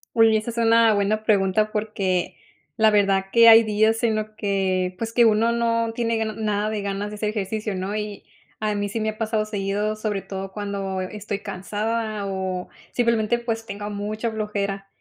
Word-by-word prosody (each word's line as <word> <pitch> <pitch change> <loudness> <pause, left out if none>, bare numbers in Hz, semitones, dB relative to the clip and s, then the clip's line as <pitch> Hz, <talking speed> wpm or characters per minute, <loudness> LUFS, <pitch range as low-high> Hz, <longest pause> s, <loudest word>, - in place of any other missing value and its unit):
Uy, 225 -1 +5
esa 215 +2 -2
es 235 - -7
una 230 -1 +5
buena 210 +1 0
pregunta 210 0 +2
porque 195 -4 -1 0.4
la 220 0 +5
verdad 195 -2 +2
que 230 -1 +7
hay 225 0 +9
días 220 +1 +2
en 225 -2 +2
los 215 0 -2
que 190 -3 0
pues 230 -1 -3
que 240 - +5
uno 225 +1 +3
no 230 -1 +1
tiene 230 -1 0
ga 220 - 0
nada 215 -1 -1
de 215 -1 -3
ganas 200 +1 -3
de - - -7
hacer 210 0 -2
ejercicio, 210 0 -3
¿no? 190 +3 -3
Y 210 -1 -5 0.4
a 215 -1 0
mí 205 0 -2
sí 225 - -3
me 215 - -1
ha 215 - -3
pasado 220 -1 0
seguido, 205 +1 -2
sobre 215 -2 -2
todo 195 0 -6
cuando 200 -2 -3
estoy 200 +2 -4
cansada 210 +2 -3
o 190 -1 -3 0.2
simplemente 235 -1 +1
pues 225 -1 -3
tengo 205 -2 -6
mucha 210 +3 -3
flojera. 200 -2 -3
215 Hz, 190 wpm, -23 LUFS, 200-225 Hz, 0.4 s, hay